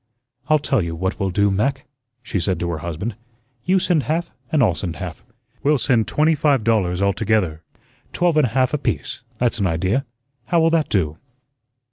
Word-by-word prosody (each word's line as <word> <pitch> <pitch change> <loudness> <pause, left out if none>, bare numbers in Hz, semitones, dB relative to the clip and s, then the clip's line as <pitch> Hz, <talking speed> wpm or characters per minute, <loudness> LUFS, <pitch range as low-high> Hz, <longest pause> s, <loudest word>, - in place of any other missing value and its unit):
"I'll 155 - +5
tell 135 -5 0
you 85 -1 -3
what 95 +4 -2
we'll 95 -2 0
do, 100 +2 +2
Mac," 130 +8 0 0.4
she 100 - -2
said 90 +2 -1
to 85 - -2
her 80 - -3
husband, 85 +8 -4 0.5
"you 185 +2 +3
send 175 -4 +2
half 165 +7 -2 0.2
and 150 -4 +3
I'll 100 -6 +3
send 85 -1 -4
half; 90 -3 -7 0.4
we'll 150 +1 +3
send 120 -4 +2
twenty 155 +2 +3
five 145 -5 +2
dollars 100 -5 +1
altogether. 100 -5 +1 0.5
Twelve 175 -2 +1
and 150 -4 +4
a 115 - -9
half 130 +1 +2
apiece. 150 - -2 0.2
That's 120 -1 0
an 100 - +2
idea. 95 +10 0 0.4
How 170 - +2
will 165 0 +4
that 165 -2 +1
do?" 80 -5 0
110 Hz, 185 wpm, -21 LUFS, 95-145 Hz, 0.5 s, I'll